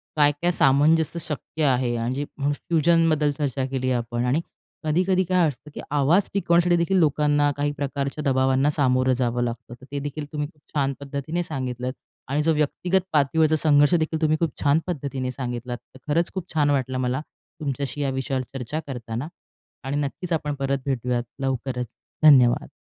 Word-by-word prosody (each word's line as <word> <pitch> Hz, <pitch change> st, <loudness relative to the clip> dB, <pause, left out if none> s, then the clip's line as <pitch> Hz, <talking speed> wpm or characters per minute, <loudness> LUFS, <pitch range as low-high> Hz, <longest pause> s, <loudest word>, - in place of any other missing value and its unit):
काय-काय 145 Hz, +3 st, +3 dB
सामंजस्य 155 Hz, +3 st, +3 dB
शक्य 155 Hz, 0 st, -3 dB
आहे 125 Hz, -3 st, +2 dB
आणि 115 Hz, +2 st, -1 dB
जे 145 Hz, +2 st, -2 dB, 0.3 s
फ्युजनबद्दल 165 Hz, -1 st, +2 dB
चर्चा 140 Hz, -2 st, -2 dB
केली 130 Hz, -1 st, -2 dB
आपण 120 Hz, 0 st, -1 dB
आणि 135 Hz, +6 st, +1 dB, 0.4 s
कधी-कधी 180 Hz, +4 st, +2 dB
काय 180 Hz, -2 st, +2 dB
असतं, 150 Hz, +1 st, -7 dB
की -, -, -6 dB
आवाज 150 Hz, +7 st, +3 dB
टिकवण्यासाठी 175 Hz, -2 st, +3 dB
देखील 170 Hz, +3 st, +1 dB
लोकांना 145 Hz, -2 st, +3 dB
काही 145 Hz, 0 st, 0 dB
प्रकारच्या 140 Hz, +1 st, -3 dB
दबावांना 135 Hz, 0 st, +2 dB
सामोरं 130 Hz, -3 st, +2 dB
जावं 120 Hz, -1 st, 0 dB
लागतं. 120 Hz, 0 st, -5 dB
तर 130 Hz, -, -14 dB
ते 145 Hz, -, -2 dB
देखील 145 Hz, +1 st, -5 dB
तुम्ही 150 Hz, -1 st, -2 dB
खूप 150 Hz, -1 st, -24 dB
छान 140 Hz, -1 st, +1 dB
पद्धतीने 140 Hz, +5 st, -3 dB
सांगितलंत 130 Hz, -5 st, -4 dB, 0.4 s
आणि 145 Hz, +2 st, +1 dB
जो 165 Hz, +1 st, +3 dB
व्यक्तिगत 175 Hz, +5 st, +1 dB
पातळीवरचा 155 Hz, +2 st, +3 dB
संघर्ष 145 Hz, 0 st, +4 dB
देखील 160 Hz, -1 st, -1 dB
तुम्ही 155 Hz, 0 st, +3 dB
खूप 165 Hz, -3 st, 0 dB
छान 145 Hz, +2 st, +4 dB
पद्धतीने 140 Hz, -6 st, -3 dB
सांगितलात, 125 Hz, -1 st, -4 dB
तर 130 Hz, +5 st, -11 dB
खरंच 170 Hz, +2 st, +1 dB
खूप 185 Hz, -2 st, -6 dB
छान 150 Hz, -2 st, +2 dB
वाटलं, 130 Hz, -2 st, 0 dB
मला 130 Hz, +2 st, -1 dB, 0.4 s
तुमच्याशी 140 Hz, -1 st, -3 dB
या 140 Hz, -, +1 dB
विषयावर 135 Hz, 0 st, -2 dB
चर्चा 135 Hz, +3 st, -4 dB
करताना. 120 Hz, 0 st, -5 dB, 0.6 s
आणि 135 Hz, +2 st, -2 dB
नक्कीच 145 Hz, +5 st, -3 dB
आपण 150 Hz, -2 st, -1 dB
परत 135 Hz, 0 st, 0 dB
भेटूयात 125 Hz, -3 st, -1 dB, 0.2 s
लवकरच. 130 Hz, -2 st, -2 dB, 0.4 s
धन्यवाद. 130 Hz, -6 st, +6 dB
145 Hz, 165 wpm, -24 LUFS, 130-155 Hz, 0.6 s, धन्यवाद